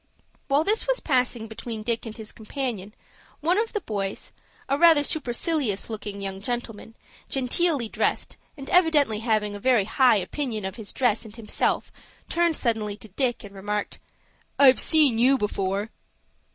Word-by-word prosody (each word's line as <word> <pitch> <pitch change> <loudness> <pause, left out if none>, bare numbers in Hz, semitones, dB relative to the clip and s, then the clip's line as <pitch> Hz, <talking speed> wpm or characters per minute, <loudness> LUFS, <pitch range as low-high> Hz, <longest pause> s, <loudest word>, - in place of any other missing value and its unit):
While 285 +2 +3
this 430 +7 +1
was - - +2
passing 250 -5 0
between 220 0 -6
Dick 230 0 -2
and 220 - -8
his 220 -1 -7
companion, 220 -3 -5 0.4
one 350 +6 +2
of 450 +1 -1
the 420 - -2
boys, 200 - -4 0.4
a 275 - +1
rather 325 -1 +6
supercilious 260 - -1
looking 205 -2 -6
young 195 0 -5
gentleman, 225 -1 -5 0.3
genteelly 270 0 +1
dressed, - - -1 0.2
and 275 -1 -9
evidently 300 -11 +3
having 215 -2 0
a - - -7
very 240 -3 +3
high 250 +2 +4
opinion 215 +2 -3
of 190 - -4
his 220 -3 -7
dress 245 -4 +1
and 220 -1 -11
himself 225 -2 -1 0.4
turned 340 -2 +1
suddenly 215 -4 -1
to 220 - -12
Dick, 240 +5 -1
and 200 -1 -11
remarked,— 205 +1 -4 0.6
"I've 265 -2 +7
seen 295 -8 +4
you 265 +3 +5
before." 200 0 -2
235 Hz, 155 wpm, -25 LUFS, 210-280 Hz, 0.6 s, I've